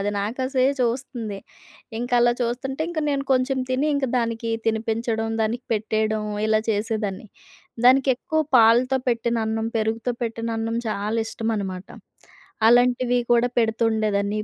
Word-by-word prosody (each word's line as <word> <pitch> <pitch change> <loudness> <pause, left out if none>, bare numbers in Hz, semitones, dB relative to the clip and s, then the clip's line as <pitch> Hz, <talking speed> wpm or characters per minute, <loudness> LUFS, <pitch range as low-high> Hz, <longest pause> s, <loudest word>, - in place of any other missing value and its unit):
అది 205 - 0
నాకాసే 255 +5 -1 0.2
చూస్తుంది, 235 -4 -2 0.6
ఇంకలా 240 0 +2
చూస్తుంటే, 255 +4 -2
ఇంక 330 -2 -2
నేను 275 -1 -1
కొంచెం 260 +1 +1
తిని 260 +3 +1
ఇంకా 280 -1 0
దానికి 230 -1 -2 0.2
తినిపించడం, 225 0 -1
దానికి 230 +3 -2
పెట్టేయడం, 215 0 0 0.2
ఇలా 215 0 +3
చేసేదాన్ని. 210 -1 -2 0.6
దానికెక్కువ 265 +4 +3 0.2
పాలతో 240 +3 +5
పెట్టిన 235 0 0
అన్నం, 220 0 -1
పెరుగుతో 225 +2 -1
పెట్టిన 230 0 -3
అన్నం 225 +1 -2
చాలా 210 +2 -2
ఇష్టమనమాట. 205 -5 -3 0.8
అలాంటివి 245 +1 +3
కూడా 240 +1 +3
పెడుతుండేదాన్ని. 220 -3 +1
230 Hz, 115 wpm, -23 LUFS, 220-245 Hz, 0.8 s, పాలతో